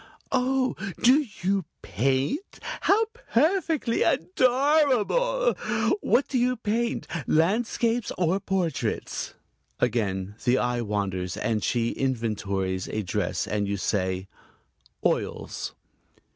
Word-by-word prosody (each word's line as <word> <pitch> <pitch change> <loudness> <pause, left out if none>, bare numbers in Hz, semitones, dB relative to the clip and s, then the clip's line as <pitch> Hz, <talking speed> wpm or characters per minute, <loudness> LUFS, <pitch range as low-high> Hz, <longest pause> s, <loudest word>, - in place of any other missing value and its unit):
"Oh, 260 0 +1 0.3
do 270 +4 +5 0.2
you 195 +1 +2 0.2
paint? 135 - -1
How 435 +3 +2
perfectly 320 - +1
adorable! 285 - +3 0.5
What 270 - +2
do 260 - 0
you 250 +1 +2
paint 230 +2 -1 0.2
landscapes 225 +7 +1
or 180 +2 +2
portraits?" 185 -6 -2 0.4
Again 100 -5 0
the 125 +1 +3
eye 125 -1 0
wanders 100 -4 -2
and 110 -3 -1
she 115 -1 +1
inventories 100 -7 -1
a 110 - -2
dress, 90 - -1
and 100 +1 -1
you 100 0 -1
say: 95 -1 -1 0.8
"Oils." - - -1
180 Hz, 100 wpm, -26 LUFS, -, 0.8 s, do